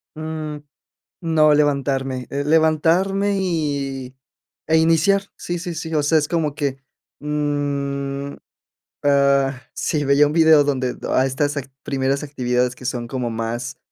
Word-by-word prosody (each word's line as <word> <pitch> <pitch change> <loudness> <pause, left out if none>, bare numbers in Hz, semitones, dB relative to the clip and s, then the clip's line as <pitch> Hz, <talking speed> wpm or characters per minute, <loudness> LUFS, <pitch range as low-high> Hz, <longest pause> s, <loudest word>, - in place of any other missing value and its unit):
Mm, 155 -1 -5 0.6
no, 155 -3 +4
levantarme, 135 -3 0
eh, 140 +1 -2
levantarme 165 +6 +2
y, 140 -7 -2 0.5
eh, 160 +1 +4
iniciar. 165 +5 +3
Sí, 175 0 -4
sí, 175 0 -5
sí, 160 0 -5
o 155 - +2
sea, 160 +2 +3
es 150 -1 +1
como 155 -4 -1
que, 140 -3 -2 0.4
mm, 140 -1 -2 0.7
ah, 140 -2 +3
sí, 150 -2 -1
veía 140 +1 +5
un 145 - -1
video 160 -2 +6
donde 130 -3 -1
a 130 - +3
estas 145 +2 -1
act 135 -1 -5
primeras 135 0 -1
actividades 125 -3 -1
que 125 - -14
son 120 -2 -3
como 125 -1 -3
más, 115 +3 -4
145 Hz, 140 wpm, -21 LUFS, 135-160 Hz, 0.7 s, video